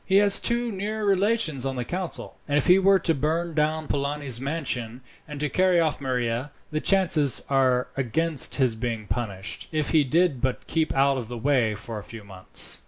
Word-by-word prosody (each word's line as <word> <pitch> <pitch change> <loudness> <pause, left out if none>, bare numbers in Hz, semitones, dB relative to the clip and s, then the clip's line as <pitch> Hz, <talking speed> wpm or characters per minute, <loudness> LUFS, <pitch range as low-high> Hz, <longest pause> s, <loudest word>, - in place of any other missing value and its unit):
He 190 - -1
has 200 0 +6
two 235 0 0
near 210 +2 -4
relations 195 - +1
on 135 -1 -2
the 125 -1 -4
council, 180 +3 -5
and 145 0 +1
if - - +1
he 180 +2 +5
were 195 0 +4
to 165 - +1
burn 160 +4 -2
down 155 0 -1
Polani's 140 -3 -1
mansion, 130 -5 -4 0.3
and 150 -2 -8
to 150 - -1
carry 185 +2 +2
off 155 -3 -1
Maria, 125 0 -2 0.2
the 155 - -1
chances 165 - +4
are 130 -2 +2
against 140 +3 +2
his 130 -4 +2
being 115 -1 -4
punished, 100 -5 -4
if 155 -2 -1
he 155 -3 +4
did 155 -1 +1
but 130 -1 -2
keep 160 -1 -1
out 135 0 +2
of 120 -4 -5
the 120 +1 -7
way 120 -4 +1
for 110 +1 -7
a - - -11
few 115 0 -11
months." 95 -2 -2
145 Hz, 195 wpm, -24 LUFS, 125-170 Hz, 0.3 s, has